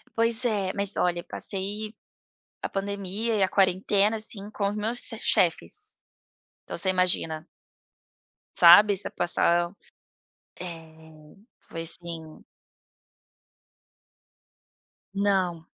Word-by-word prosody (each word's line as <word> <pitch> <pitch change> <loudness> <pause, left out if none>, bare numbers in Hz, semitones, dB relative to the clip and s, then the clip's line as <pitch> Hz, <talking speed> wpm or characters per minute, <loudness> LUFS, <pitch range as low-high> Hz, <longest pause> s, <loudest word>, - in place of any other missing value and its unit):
Pois 230 +1 +3
é, 200 -5 0
mas 200 -1 0
olha 175 -1 0
passei, 205 +2 -5 0.7
a - - -3
pandemia 200 +3 -3
e 200 - +1
a 190 - +3
quarentena 195 +3 +2
assim 215 -1 -4
com 200 -2 -1
os 205 - -4
meus 225 +3 -2
se 225 - -1
chefes. 160 - +1 0.7
Então - - -6
você 190 - +1
imagina 175 -3 0 1.1
sabe 195 +4 +8
você - - -1
passar, 175 0 +1 0.9
eh, 160 -3 -11 0.3
foi 165 - -5
assim 165 -1 -4 2.7
Não. 190 -5 0
190 Hz, 100 wpm, -26 LUFS, 170-205 Hz, 2.7 s, sabe